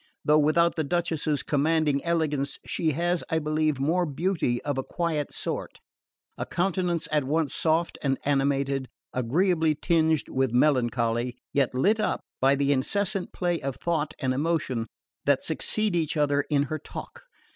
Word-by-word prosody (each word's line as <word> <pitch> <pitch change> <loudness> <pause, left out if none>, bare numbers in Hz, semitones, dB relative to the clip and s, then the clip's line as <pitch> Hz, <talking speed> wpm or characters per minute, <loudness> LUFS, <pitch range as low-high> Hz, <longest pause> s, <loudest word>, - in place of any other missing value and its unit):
Though 150 +1 +5
without 170 +3 +3
the 160 - 0
Duchess's 155 -2 -1
commanding 150 -1 +1
elegance 155 -5 0
she 160 - 0
has, 175 +3 0
I 160 - +1
believe, 155 -2 0
more 170 +6 +1
beauty 155 -5 0
of 145 -2 -1
a - - -2
quiet 160 -3 -2
sort: - - -4 0.6
a - - -2
countenance 175 -2 0
at 150 -2 +2
once 150 +2 0
soft 165 +1 0
and 135 -2 +1
animated, 140 -1 +1 0.2
agreeably 160 +5 +2
tinged 160 -2 +1
with 130 -2 0
melancholy, 120 -3 +1 0.2
yet 135 -3 +1
lit 205 - +3
up 215 - 0 0.2
by 135 +1 +4
the 140 0 +1
incessant 195 +8 0
play 175 -3 -1
of 135 -1 -3
thought 155 -3 -2
and 130 -2 0
emotion 135 -5 -1 0.4
that 140 -1 +3
succeed 205 +5 0
each 165 -1 0
other 145 -1 +2
in 145 -2 +3
her 155 +3 -4
talk. - - -9
150 Hz, 155 wpm, -26 LUFS, 140-170 Hz, 0.6 s, Though